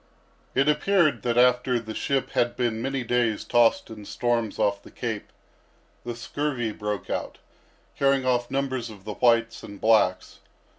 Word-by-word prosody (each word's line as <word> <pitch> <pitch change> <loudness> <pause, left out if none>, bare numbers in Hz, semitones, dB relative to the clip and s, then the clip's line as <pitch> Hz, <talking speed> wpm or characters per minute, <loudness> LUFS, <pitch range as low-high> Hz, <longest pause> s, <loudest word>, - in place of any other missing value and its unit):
It 135 +2 +3
appeared 150 - +2
that 120 +1 -1
after 125 0 +4
the 110 -1 -7
ship 135 +4 -1
had 120 0 +1
been 120 -3 -1
many 135 0 -2
days 120 -2 0
tossed 120 -1 +2
in 105 -2 -9
storms 120 -2 -1
off 100 0 +1
the - - -14
Cape, - - -5 0.7
the 120 -1 -5
scurvy 120 -1 -3
broke 105 -2 -4
out, - - -4 0.6
carrying 135 -1 +2
off 120 -1 +1
numbers 130 -3 -2
of 100 -3 -12
the 105 - -4
whites 115 0 +2
and 100 -1 -10
blacks. 110 -5 +2
120 Hz, 155 wpm, -25 LUFS, 110-130 Hz, 0.7 s, after